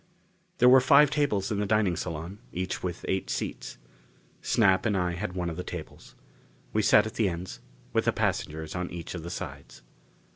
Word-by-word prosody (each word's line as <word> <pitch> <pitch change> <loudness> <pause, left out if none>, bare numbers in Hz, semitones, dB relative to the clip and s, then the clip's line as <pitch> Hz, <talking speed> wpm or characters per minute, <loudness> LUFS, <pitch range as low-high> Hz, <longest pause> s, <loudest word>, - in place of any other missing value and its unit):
There 125 - +5
were 130 +1 +8
five 140 +3 +6
tables 135 -11 0
in 100 - -1
the 105 - -1
dining 105 -4 +2
salon, 85 +4 -5
each 90 +1 -3
with 90 -1 -5
eight 95 0 -1
seats. - - -4 0.6
Snap 95 -5 +3
and 105 -4 +1
I 90 -1 0
had 90 +2 -4
one 90 -1 -2
of 85 -1 -4
the 90 - -3
tables. - - -9 0.6
We 110 - +2
sat 105 +1 +5
at 110 - -5
the 110 -4 +1
ends, 90 +1 -6 0.3
with - - +1
the - - +3
passengers 80 0 -2
on 90 -1 -3
each 85 -1 -7
of 85 - -5
the 85 - -7
sides. 85 - -8
95 Hz, 190 wpm, -28 LUFS, 85-110 Hz, 0.6 s, were